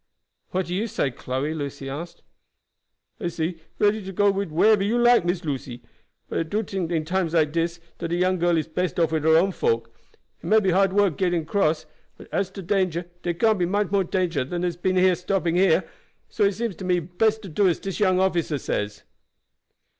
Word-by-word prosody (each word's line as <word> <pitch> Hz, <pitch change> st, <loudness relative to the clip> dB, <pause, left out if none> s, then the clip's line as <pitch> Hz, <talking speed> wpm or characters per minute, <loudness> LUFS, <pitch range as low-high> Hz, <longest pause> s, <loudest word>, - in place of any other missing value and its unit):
"What 185 Hz, 0 st, -1 dB
do 175 Hz, -, -5 dB
you 210 Hz, +5 st, -1 dB
say, 140 Hz, -9 st, -1 dB
Chloe?" 130 Hz, +5 st, -3 dB
Lucy 140 Hz, -3 st, -5 dB
asked. 160 Hz, +6 st, -7 dB, 1.0 s
"I'se 170 Hz, -3 st, -2 dB, 0.2 s
ready 210 Hz, 0 st, +2 dB
to 190 Hz, -, -6 dB
go 200 Hz, +2 st, +3 dB
wid 195 Hz, -2 st, -2 dB
you 155 Hz, -, -11 dB
whereber 210 Hz, +3 st, +5 dB
you 220 Hz, +4 st, +1 dB
like, 240 Hz, -5 st, +5 dB
Miss 175 Hz, -1 st, -1 dB
Lucy; 130 Hz, -4 st, -5 dB, 0.4 s
but -, -, -2 dB
I -, -, +1 dB
do 205 Hz, +7 st, -1 dB
tink 190 Hz, -3 st, -3 dB
dat 175 Hz, -, -1 dB
in 155 Hz, -1 st, -1 dB
times 175 Hz, -1 st, -1 dB
like 155 Hz, -2 st, +3 dB
dis 170 Hz, +1 st, -1 dB, 0.2 s
dat 170 Hz, -1 st, -4 dB
a -, -, +1 dB
young 185 Hz, +1 st, +1 dB
gal 175 Hz, 0 st, +2 dB
is 155 Hz, -, -1 dB
best 180 Hz, +3 st, -2 dB
wid 160 Hz, -3 st, +1 dB
her 160 Hz, 0 st, +5 dB
own 190 Hz, +4 st, +3 dB
folk. 115 Hz, -8 st, -1 dB, 0.4 s
It -, -, -9 dB
may 220 Hz, +1 st, +5 dB
be 195 Hz, -3 st, +1 dB
hard 195 Hz, +1 st, +3 dB
work 200 Hz, -5 st, +2 dB
getting 175 Hz, -3 st, +1 dB
across, 160 Hz, -2 st, 0 dB, 0.3 s
but -, -, -13 dB
as 195 Hz, -1 st, 0 dB
to 195 Hz, -, -7 dB
danger 175 Hz, -2 st, -1 dB
dar 175 Hz, -, -1 dB
can't 215 Hz, +4 st, +2 dB
be 175 Hz, -, +1 dB
much 200 Hz, 0 st, 0 dB
more 200 Hz, -1 st, +3 dB
danger 175 Hz, -6 st, 0 dB
than 175 Hz, +7 st, -4 dB
dar 180 Hz, -, +1 dB
has 170 Hz, -, -7 dB
been 185 Hz, +2 st, 0 dB
in 185 Hz, 0 st, +4 dB
stopping 180 Hz, -1 st, 0 dB
along 190 Hz, 0 st, +5 dB
here, 165 Hz, +1 st, +2 dB, 0.4 s
so 210 Hz, -, +1 dB
it 200 Hz, -, +2 dB
seems 225 Hz, -2 st, -3 dB
to -, -, -8 dB
me 180 Hz, -1 st, +2 dB
best 210 Hz, +7 st, 0 dB
to -, -, -7 dB
do 190 Hz, +5 st, +2 dB
as 175 Hz, -, +2 dB
dis 195 Hz, +1 st, -5 dB
young 185 Hz, -3 st, +3 dB
officer 175 Hz, -5 st, +1 dB
says." 105 Hz, -5 st, -3 dB
180 Hz, 225 wpm, -24 LUFS, 160-195 Hz, 1.0 s, whereber